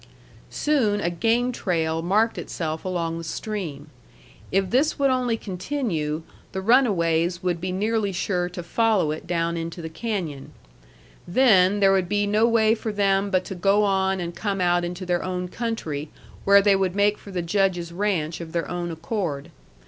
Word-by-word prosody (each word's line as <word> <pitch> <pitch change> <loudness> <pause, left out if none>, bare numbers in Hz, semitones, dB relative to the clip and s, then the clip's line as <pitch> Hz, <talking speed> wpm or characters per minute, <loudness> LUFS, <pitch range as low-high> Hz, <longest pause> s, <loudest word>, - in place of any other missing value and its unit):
Soon 245 -9 +1
a 175 -3 -1
game 230 +7 +1
trail 165 -7 -1
marked 210 +7 +1
itself 160 -1 -4
along 170 -3 -2
the - - -6
stream. 160 -6 -5 0.6
If 195 -1 +1
this 280 +6 +2
would 275 -1 +3
only 250 -3 +1
continue, 180 - -3 0.3
the 190 - -3
runaways 180 -7 +2
would 175 -2 -1
be 185 0 -2
nearly 210 +2 0
sure 180 -1 -1
to 175 -1 -7
follow 210 -4 +2
it 155 +2 -6
down 170 -1 0
into 165 +1 -5
the 160 -1 -5
canyon. 165 -7 -4 0.7
Then 205 -2 +4
there 195 -1 +6
would 190 -2 +1
be 205 0 +1
no 210 +3 +3
way 220 -2 +4
for 225 -1 -3
them 200 -1 +1
but 185 -2 +1
to - - -5
go 195 +3 +2
on 190 -1 +1
and 170 -1 -4
come 200 -2 -2
out 175 -1 +2
into 175 +2 -5
their 175 -1 0
own 180 -1 -3
country, 165 -11 -4 0.4
where 200 0 +6
they 200 -1 +5
would 190 -1 0
make 205 +1 +2
for - - -13
the 180 -3 -3
Judge's 175 -1 0
ranch 175 -4 -1
of 160 -1 -8
their 170 -1 -1
own 175 -1 -3
accord. 165 -3 -4
185 Hz, 175 wpm, -24 LUFS, 170-210 Hz, 0.7 s, there